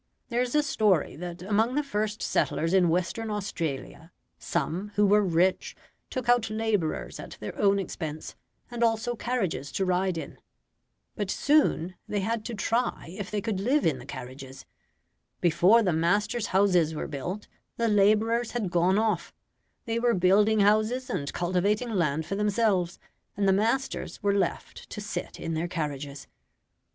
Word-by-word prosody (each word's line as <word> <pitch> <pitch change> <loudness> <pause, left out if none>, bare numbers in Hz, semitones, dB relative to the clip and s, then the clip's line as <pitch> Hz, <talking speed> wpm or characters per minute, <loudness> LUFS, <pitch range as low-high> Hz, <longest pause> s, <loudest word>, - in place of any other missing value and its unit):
There 240 0 +1
is 250 +2 -1
a 300 - +4
story 215 - +2
that 175 +1 -7
among 220 +5 +1
the 295 - +1
first 215 -4 -2
settlers 165 +2 0
in 180 -3 +4
Western 180 +6 -1
Australia, 165 -5 -4 0.3
some, 170 +5 -2
who 210 - +4
were 205 +1 +5
rich, 180 0 +1 0.3
took 255 -2 -4
out 240 -2 +3
labourers 215 -7 -1
at - - -9
their - - -6
own 200 -1 +3
expense, 160 -5 -5 0.4
and 240 0 -1
also 230 +1 +1
carriages 205 - -2
to 195 - 0
ride 185 -1 +1
in. - - -7 0.8
But 205 -3 -3
soon 275 - +2
they 205 - -1
had 225 +2 -1
to 235 - -4
try 225 -4 -1
if 200 0 -5
they 210 -1 -2
could 210 -3 -2
live 265 +9 +2
in 145 -5 +1
the 125 - -12
carriages. 130 +1 -9 0.7
Before 180 +7 +5
the 180 -4 +1
masters' 205 +7 +1
houses 180 -5 +3
were - - -3
built, 175 +8 -5 0.3
the 235 - +1
labourers 215 +3 +3
had 215 -7 -2
gone 175 +3 +3
off 215 -5 0 0.5
they 230 -1 -1
were 235 0 +2
building 205 +4 +4
houses 215 +5 +2
and 140 -1 -2
cultivating 200 +7 0
land 160 -6 0
for - - -4
themselves, 205 -3 +1 0.4
and 200 -1 +1
the 190 - +5
masters 230 +6 -1
were 200 0 +3
left 195 -4 -2
to - - -6
sit - - -5
in 165 - -3
their 160 +2 -1
carriages. 145 -5 -4
200 Hz, 160 wpm, -27 LUFS, 170-225 Hz, 0.8 s, were